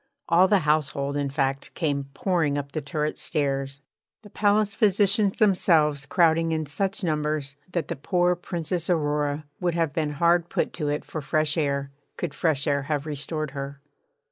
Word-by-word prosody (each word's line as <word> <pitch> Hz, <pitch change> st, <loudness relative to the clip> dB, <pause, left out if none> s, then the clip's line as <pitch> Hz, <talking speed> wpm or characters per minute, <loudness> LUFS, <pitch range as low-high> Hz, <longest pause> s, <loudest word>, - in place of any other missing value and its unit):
All 175 Hz, +3 st, +5 dB
the 200 Hz, -1 st, +3 dB
household, 145 Hz, -2 st, 0 dB
in 145 Hz, -1 st, -1 dB
fact, 135 Hz, -1 st, -2 dB
came 145 Hz, -4 st, -1 dB
pouring 165 Hz, -6 st, +1 dB
up 140 Hz, -1 st, -4 dB
the 155 Hz, -, -3 dB
turret 150 Hz, +1 st, -2 dB
stairs; 135 Hz, -1 st, -1 dB, 0.4 s
the 205 Hz, -, -14 dB
palace 205 Hz, 0 st, +2 dB
physicians 205 Hz, -1 st, +3 dB
themselves 155 Hz, -8 st, +3 dB
crowding 165 Hz, -1 st, +3 dB
in 160 Hz, -1 st, -1 dB
such 190 Hz, +8 st, -1 dB
numbers 150 Hz, -3 st, -1 dB, 0.2 s
that 170 Hz, -4 st, -2 dB
the -, -, -3 dB
poor 180 Hz, +5 st, +1 dB
Princess 175 Hz, 0 st, -3 dB
Aurora 150 Hz, -2 st, 0 dB
would 175 Hz, -2 st, 0 dB
have 165 Hz, -4 st, 0 dB
been 150 Hz, -2 st, -1 dB
hard 170 Hz, +3 st, +2 dB
put -, -, -1 dB
to 150 Hz, -3 st, -2 dB
it 145 Hz, +1 st, -2 dB
for 155 Hz, -, -5 dB
fresh 155 Hz, +1 st, 0 dB
air 140 Hz, -3 st, -1 dB, 0.3 s
could 170 Hz, -5 st, -3 dB
fresh 150 Hz, -4 st, 0 dB
air 140 Hz, -1 st, +1 dB
have 150 Hz, -1 st, -1 dB
restored 155 Hz, 0 st, -3 dB
her. 140 Hz, 0 st, -6 dB
155 Hz, 170 wpm, -25 LUFS, 145-175 Hz, 0.4 s, All